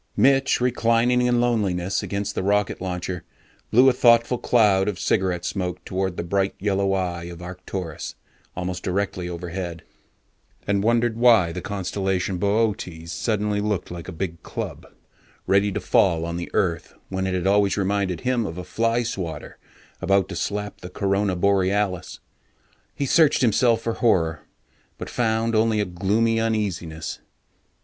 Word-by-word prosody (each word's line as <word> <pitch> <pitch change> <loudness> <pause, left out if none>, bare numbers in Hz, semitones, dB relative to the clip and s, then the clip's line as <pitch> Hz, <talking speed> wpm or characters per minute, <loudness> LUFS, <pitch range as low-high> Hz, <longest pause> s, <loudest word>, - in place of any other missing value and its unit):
Mitch, 135 0 +4
reclining 120 0 +2
in 125 -1 +2
loneliness 100 -6 0
against 100 0 -3
the - - -2
rocket 100 0 0
launcher, 90 -1 -4 0.5
blew 125 +4 +6
a 130 - +6
thoughtful 120 0 +4
cloud 105 -5 +3
of 105 -3 -1
cigarette 95 -4 0
smoke 90 -3 -3
toward 95 -1 -2
the - - -2
bright 95 +2 0
yellow 100 -1 0
eye 90 -3 -2
of 85 -1 -8
Arcturus, 90 -2 -6 0.4
almost 90 0 -3
directly 90 -1 -2
overhead, 85 -1 -5 0.8
and 100 -1 +1
wondered 115 +1 +2
why 115 -8 +5
the 90 +2 -5
Constellation 95 -1 -2
Boötes 100 -5 -1
suddenly 105 +1 -1
looked 105 -5 -2
like 85 -1 -7
a - - -5
big 85 0 -5
club - - -6 0.6
ready 100 +1 +3
to - - -2
fall 80 -1 +2
on 85 0 -4
the 85 0 -5
earth, 85 -4 -1
when 95 0 -2
it 95 - -1
had 90 -1 -2
always 100 0 +3
reminded 100 -2 0
him 125 -4 0
of 80 - -7
a 90 - -5
fly 115 +6 0
swatter 90 -9 -5 0.4
about 95 -1 +2
to - - -5
slap 105 0 -3
the 90 - -7
Corona 100 0 0
Borealis. 95 0 0 0.8
He 140 - -1
searched 150 +1 +4
himself 115 -1 +3
for 115 - -1
horror, 80 -10 +1 0.5
but - - -7
found 115 -1 0
only 110 0 +2
a 105 - +1
gloomy 105 +6 +1
uneasiness. 95 -8 -2
100 Hz, 150 wpm, -23 LUFS, 90-110 Hz, 0.8 s, blew